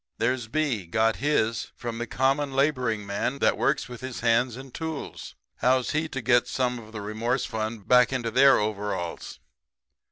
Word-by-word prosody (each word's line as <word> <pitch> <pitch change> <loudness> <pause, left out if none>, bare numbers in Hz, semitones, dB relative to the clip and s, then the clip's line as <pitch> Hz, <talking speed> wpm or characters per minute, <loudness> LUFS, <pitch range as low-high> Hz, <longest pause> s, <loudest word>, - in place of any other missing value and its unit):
"There's 120 0 0
B 120 - -1
got 110 +3 +2
his 115 -6 0
from 120 -1 -5
the 120 - -3
common 135 +3 +1
laboring 130 -7 +1
man 100 +7 -2
that - - +3
works 145 - 0
with 125 -2 -9
his 130 -1 -6
hands 120 +1 +2
and 130 0 -10
tools. 160 -2 -6 0.2
How's 130 0 +2
he 155 +1 0
to 135 - -4
get 120 0 +3
some 125 -2 -1
of 110 -1 -13
the 110 -2 -6
remorse 115 +5 -1
fund 110 -1 -4
back 125 0 +5
into 120 -3 -2
their 135 +3 +6
overalls? 105 -5 -3
120 Hz, 170 wpm, -26 LUFS, 110-135 Hz, 0.2 s, their